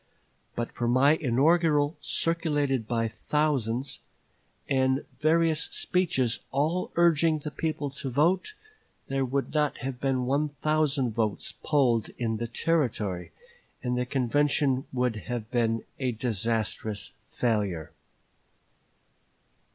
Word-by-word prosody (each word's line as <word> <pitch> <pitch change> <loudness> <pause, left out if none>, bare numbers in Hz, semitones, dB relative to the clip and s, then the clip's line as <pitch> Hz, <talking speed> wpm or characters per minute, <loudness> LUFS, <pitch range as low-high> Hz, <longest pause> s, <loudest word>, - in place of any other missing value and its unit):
But 120 0 -3
for 120 - -2
my 130 +4 +5
inaugural, 150 +2 +3
circulated 145 -8 0
by 115 -1 0
thousands, 135 -1 -1 0.7
and 130 0 +1
various 160 +1 +3
speeches 160 -10 +1
all 155 +7 0
urging 165 -2 +4
the 150 0 -6
people 155 -3 -2
to 135 0 -4
vote, 175 - +1 0.5
there 135 0 0
would 135 +2 -2
not 150 -2 +1
have 130 -2 -4
been 130 -2 0
one 145 +4 +1
thousand 150 -5 +2
votes 110 -2 -1
polled 125 -7 +2
in 115 -2 -1
the 120 +1 -3
Territory, 115 - -1 0.5
and 125 -1 0
the 125 0 -1
convention 135 +1 +1
would 125 -3 0
have 120 -2 -4
been 115 -2 +1 0.2
a 130 -2 0
disastrous 110 -2 -1
failure." 105 -9 -1
135 Hz, 110 wpm, -27 LUFS, 120-150 Hz, 0.7 s, my